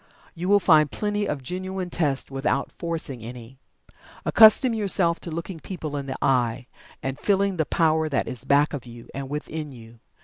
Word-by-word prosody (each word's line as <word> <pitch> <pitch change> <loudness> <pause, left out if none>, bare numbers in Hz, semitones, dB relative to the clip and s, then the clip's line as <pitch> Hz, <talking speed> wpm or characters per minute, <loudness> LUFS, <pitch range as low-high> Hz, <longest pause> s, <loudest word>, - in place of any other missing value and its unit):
You 180 +2 -4
will 205 0 +6
find 155 -6 +4
plenty 210 -1 -1
of 140 - -3
genuine 185 +3 -4
tests 145 -6 -1
without 135 +1 -1
forcing 160 -7 -4
any. 120 +2 -10 0.7
Accustom 230 +3 +7
yourself 190 -5 +3
to - - -6
looking 170 +2 -6
people 155 -3 -6
in 140 -1 -4
the 130 - -4
eye, 125 -2 +1 0.4
and 135 +1 -4
feeling 200 +1 +1
the 160 - 0
power 160 -1 +2
that 135 - -1
is 125 -1 -4
back 145 +3 +3
of 130 -4 -6
you, 120 0 -12
and 135 -1 -6
within 150 +1 -5
you. 115 -2 -14
155 Hz, 175 wpm, -24 LUFS, 135-180 Hz, 0.7 s, Accustom